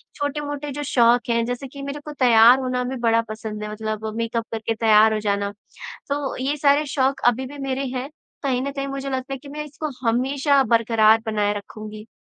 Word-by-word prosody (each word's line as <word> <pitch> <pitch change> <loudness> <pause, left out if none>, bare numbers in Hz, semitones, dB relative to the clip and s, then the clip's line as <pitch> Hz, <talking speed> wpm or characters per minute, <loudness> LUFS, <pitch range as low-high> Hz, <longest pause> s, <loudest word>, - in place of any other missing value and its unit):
छोटे-मोटे 290 0 -3
जो 290 +2 -4
शौक 240 -2 +3
हैं, 230 0 +2
जैसे 245 +3 -4
कि 275 +2 -10
मेरे 280 +1 -5
को 300 - -6
तैयार 240 +1 +7
होना 255 -1 -1
भी 260 +1 -4
बड़ा 230 0 +4
पसंद 215 -1 -6
है, 210 - -5
मतलब 215 0 -4
मेकअप 230 0 -2
करके 225 0 -2
तैयार 220 -1 +5
हो 215 - 0
जाना। 200 -1 -1 0.6
तो 280 -1 -2
ये 280 +3 -1
सारे 290 +1 +3
शौक़ 270 -1 0
अभी 255 +2 0
भी 285 +2 -10
मेरे 270 +1 -1
हैं। 260 +2 -3 0.3
कहीं 260 -3 0
न 280 - -2
कहीं 275 0 -4
मुझे 275 0 -4
लगता 260 +1 -3
है 270 - -3
कि 280 +2 -13
मैं 300 +1 -5
इसको 300 +1 -5 0.2
हमेशा 270 +4 +2
बरक़रार 225 -1 +4
बनाए 210 -2 +1
रखूँगी। 215 +1 -10
250 Hz, 200 wpm, -22 LUFS, 220-275 Hz, 0.6 s, तैयार